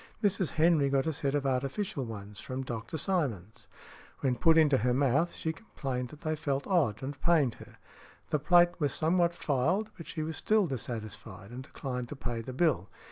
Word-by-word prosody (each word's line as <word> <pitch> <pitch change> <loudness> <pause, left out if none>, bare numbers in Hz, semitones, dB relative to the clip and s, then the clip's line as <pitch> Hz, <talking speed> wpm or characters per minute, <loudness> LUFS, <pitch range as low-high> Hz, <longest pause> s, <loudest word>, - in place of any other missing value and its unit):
Mrs. 195 -4 +2
Henry 155 -3 +4
got 135 -1 +2
a 160 - 0
set 140 0 -1
of 145 -1 0
artificial 135 +6 -1
ones 105 -2 -8
from 130 0 -4
Dr. 115 +3 -5
Simonds; 135 - -2 0.5
when 130 -2 +2
put 165 +7 +5
into 150 -4 +5
her 125 +3 +2
|168| - - 0
mouth, 140 +5 +2
she 160 - -2
complained 135 - -4
that 150 +3 -13
they 155 -2 -1
felt 140 -3 -2
odd 135 - +1
and 135 0 -5
pained 155 -9 +3
her. - - -13 0.6
The 150 - +2
plate 175 +3 +4
was 145 -3 +1
somewhat 170 +1 +2
filed, 170 +10 0
but 165 - -9
she 155 - -3
was 160 -1 -4
still 215 -2 +3
dissatisfied, 110 - -6
and 125 +2 -6
declined 125 -3 -5
to - - -5
pay 120 -4 -3
the 120 - -7
bill. 130 - +1
140 Hz, 190 wpm, -30 LUFS, 125-165 Hz, 0.6 s, put